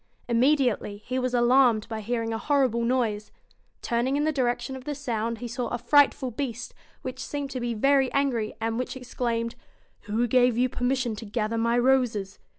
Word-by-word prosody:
Immediately 245 Hz, -4 st, +2 dB
he 255 Hz, +1 st, -2 dB
was 250 Hz, -1 st, -1 dB
alarmed 240 Hz, -2 st, +4 dB
by 220 Hz, -1 st, -5 dB
hearing 230 Hz, +1 st, -2 dB
a 225 Hz, -, -2 dB
horrible 265 Hz, -5 st, +1 dB
noise. 230 Hz, -4 st, 0 dB, 0.5 s
Turning 240 Hz, +4 st, 0 dB
in 295 Hz, -, +1 dB
the 310 Hz, -, +2 dB
direction 245 Hz, -2 st, -1 dB
of 260 Hz, -1 st, -10 dB
the 295 Hz, -, -3 dB
sound, 230 Hz, -4 st, -2 dB
he 240 Hz, +2 st, -6 dB
saw 240 Hz, +1 st, -3 dB
a 240 Hz, -, -2 dB
frightful 265 Hz, +1 st, +3 dB
Beast, 240 Hz, -1 st, -5 dB, 0.3 s
which -, -, -5 dB
seemed 285 Hz, -2 st, -4 dB
to 255 Hz, -, -3 dB
be 240 Hz, -1 st, -2 dB
very 270 Hz, +3 st, +3 dB
angry, 250 Hz, -6 st, 0 dB
and 225 Hz, +1 st, -1 dB
which 255 Hz, +1 st, -4 dB
exclaimed 235 Hz, -2 st, -2 dB, 0.5 s
'Who 220 Hz, +4 st, 0 dB
gave 245 Hz, 0 st, +3 dB
you 255 Hz, +1 st, +2 dB
permission 245 Hz, -2 st, -1 dB
to 225 Hz, -, -7 dB
gather 220 Hz, +1 st, -2 dB
my 235 Hz, +1 st, +2 dB
roses? 240 Hz, -6 st, +1 dB
245 Hz, 180 wpm, -26 LUFS, 230-260 Hz, 0.5 s, alarmed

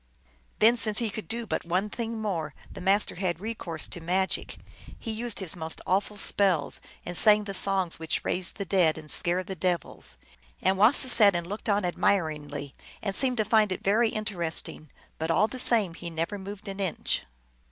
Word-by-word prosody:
Then, 230 Hz, +3 st, +5 dB
since 215 Hz, -2 st, +4 dB
he 230 Hz, -3 st, +2 dB
could 220 Hz, -, -7 dB
do 230 Hz, +1 st, -2 dB
but -, -, -3 dB
one 180 Hz, +4 st, -1 dB
thing 230 Hz, +1 st, -5 dB
more, 170 Hz, -8 st, -3 dB, 0.2 s
the -, -, -9 dB
Master 195 Hz, +3 st, +1 dB
had 175 Hz, -3 st, -2 dB
recourse 190 Hz, -7 st, -3 dB
to 175 Hz, -, -7 dB
magic. 185 Hz, +3 st, -1 dB, 0.4 s
He 225 Hz, -, -5 dB
used 230 Hz, +1 st, -4 dB
his 190 Hz, -5 st, -3 dB
most 160 Hz, -2 st, -4 dB
awful 200 Hz, +2 st, 0 dB
spells, 190 Hz, -7 st, +1 dB, 0.2 s
and 175 Hz, -, -5 dB
sang 210 Hz, +4 st, +6 dB
the 200 Hz, -1 st, -6 dB
songs 190 Hz, -3 st, +1 dB
which 160 Hz, -1 st, -3 dB
raise 180 Hz, -1 st, +1 dB
the 200 Hz, -, -6 dB
dead 175 Hz, -4 st, +2 dB
and 155 Hz, -2 st, -7 dB
scare 175 Hz, +2 st, +1 dB
the 190 Hz, -, -6 dB
devils. 175 Hz, -, -3 dB, 0.4 s
And 190 Hz, +1 st, +2 dB
Wasis 245 Hz, +6 st, +5 dB
sat 200 Hz, -4 st, +7 dB
and 170 Hz, 0 st, -2 dB
looked 205 Hz, +5 st, -6 dB
on 205 Hz, -2 st, +1 dB
admiringly, 150 Hz, -6 st, -1 dB, 0.3 s
and 200 Hz, -2 st, -1 dB
seemed 255 Hz, -2 st, +3 dB
to 215 Hz, -, +1 dB
find 215 Hz, -1 st, +3 dB
it 185 Hz, -, -4 dB
very 220 Hz, +4 st, +3 dB
interesting, 175 Hz, -7 st, -3 dB, 0.3 s
but 160 Hz, +1 st, -3 dB
all 210 Hz, +6 st, +3 dB
the 255 Hz, -, -7 dB
same 220 Hz, -8 st, +3 dB
he 170 Hz, +1 st, -8 dB
never 165 Hz, +5 st, -3 dB
moved 200 Hz, +2 st, -9 dB
an 195 Hz, 0 st, -6 dB
inch. 190 Hz, -4 st, -1 dB
195 Hz, 190 wpm, -27 LUFS, 170-215 Hz, 0.4 s, sat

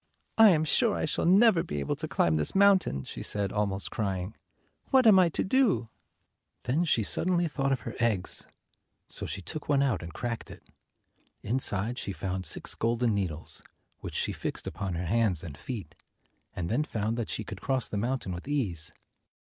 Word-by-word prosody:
" -, -, -46 dB
I 220 Hz, -1 st, +10 dB
am 160 Hz, -4 st, +3 dB
sure 225 Hz, +7 st, +2 dB
I -, -, -1 dB
shall 155 Hz, -, -1 dB
never 195 Hz, -1 st, +6 dB
be 75 Hz, -, -4 dB
able 70 Hz, -, -1 dB
to -, -, -4 dB
climb 80 Hz, -2 st, +2 dB
this 75 Hz, -, -1 dB
mountain," 195 Hz, -, +4 dB
she -, -, -8 dB
said, 100 Hz, -2 st, -2 dB
almost 100 Hz, -2 st, -2 dB
crying. 95 Hz, -2 st, -2 dB, 0.6 s
"What 260 Hz, -2 st, +5 dB
am 205 Hz, -4 st, +8 dB
I 180 Hz, -2 st, +5 dB
to -, -, -1 dB
do?" 195 Hz, -, +2 dB, 0.7 s
224 125 Hz, -, -1 dB
Then 170 Hz, +5 st, +2 dB
she 120 Hz, -8 st, +2 dB
suddenly 175 Hz, -, +1 dB
thought 140 Hz, -3 st, -1 dB
of 130 Hz, -4 st, 0 dB
her 115 Hz, -, -6 dB
eggs, 110 Hz, -6 st, +1 dB, 0.6 s
so -, -, -4 dB
she 95 Hz, -, -5 dB
took 155 Hz, -, -7 dB
one 140 Hz, -1 st, +4 dB
out 135 Hz, -5 st, 0 dB
and 85 Hz, 0 st, -7 dB
cracked 115 Hz, +7 st, -4 dB
it. -, -, -12 dB, 0.8 s
Inside 115 Hz, -1 st, 0 dB
she 100 Hz, -, -3 dB
found 95 Hz, +2 st, -3 dB
six -, -, +1 dB
golden 115 Hz, 0 st, 0 dB
needles, 85 Hz, -6 st, -1 dB, 0.4 s
which -, -, -7 dB
she -, -, +1 dB
fixed -, -, -4 dB
upon 95 Hz, -3 st, -4 dB
her 90 Hz, +2 st, -3 dB
hands 100 Hz, -3 st, +1 dB
and 75 Hz, -5 st, -7 dB
feet, 100 Hz, -, -7 dB, 0.6 s
and 85 Hz, -, -3 dB
then 120 Hz, -, +1 dB
found 110 Hz, -5 st, -2 dB
that 115 Hz, -3 st, -3 dB
she 110 Hz, -, -2 dB
could 100 Hz, -2 st, -8 dB
cross 130 Hz, -2 st, 0 dB
the -, -, -6 dB
mountain 120 Hz, -1 st, -2 dB
with 90 Hz, +7 st, -7 dB
ease. 100 Hz, -, -1 dB
115 Hz, 195 wpm, -29 LUFS, 95-150 Hz, 0.8 s, I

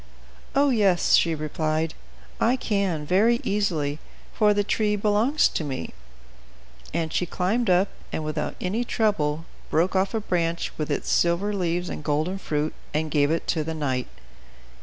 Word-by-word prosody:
"Oh 280 Hz, 0 st, +4 dB
yes," 200 Hz, -7 st, +3 dB
she 165 Hz, -1 st, +4 dB
replied, 155 Hz, +1 st, -1 dB, 0.5 s
"I 240 Hz, +3 st, +3 dB
can, 200 Hz, -10 st, -1 dB
very 215 Hz, +8 st, +3 dB
easily, 160 Hz, -8 st, 0 dB, 0.3 s
for 210 Hz, -2 st, +4 dB
the 205 Hz, 0 st, +2 dB
tree 210 Hz, 0 st, +1 dB
belongs 215 Hz, +8 st, +3 dB
to -, -, -3 dB
me." 135 Hz, -, -5 dB, 1.0 s
And 160 Hz, -1 st, -2 dB
she 180 Hz, -, 0 dB
climbed 200 Hz, +6 st, 0 dB
up, 185 Hz, +2 st, +4 dB, 0.2 s
and, 155 Hz, -, -3 dB
without 155 Hz, 0 st, -3 dB
any 205 Hz, +6 st, -1 dB
trouble, 165 Hz, -10 st, 0 dB, 0.2 s
broke 175 Hz, +5 st, +1 dB
off 190 Hz, +3 st, +1 dB
a -, -, +1 dB
branch 170 Hz, -4 st, -1 dB
with 150 Hz, -, -3 dB
its -, -, -1 dB
silver 175 Hz, +5 st, +2 dB
leaves 175 Hz, -2 st, -1 dB
and 150 Hz, -, -6 dB
golden 155 Hz, +6 st, 0 dB
fruit 150 Hz, -3 st, -1 dB, 0.2 s
and 155 Hz, 0 st, -1 dB
gave 145 Hz, -2 st, +3 dB
it 165 Hz, +1 st, 0 dB
to 160 Hz, -2 st, +1 dB
the 160 Hz, +1 st, -4 dB
knight. 130 Hz, -5 st, -1 dB
175 Hz, 160 wpm, -25 LUFS, 155-205 Hz, 1.0 s, Oh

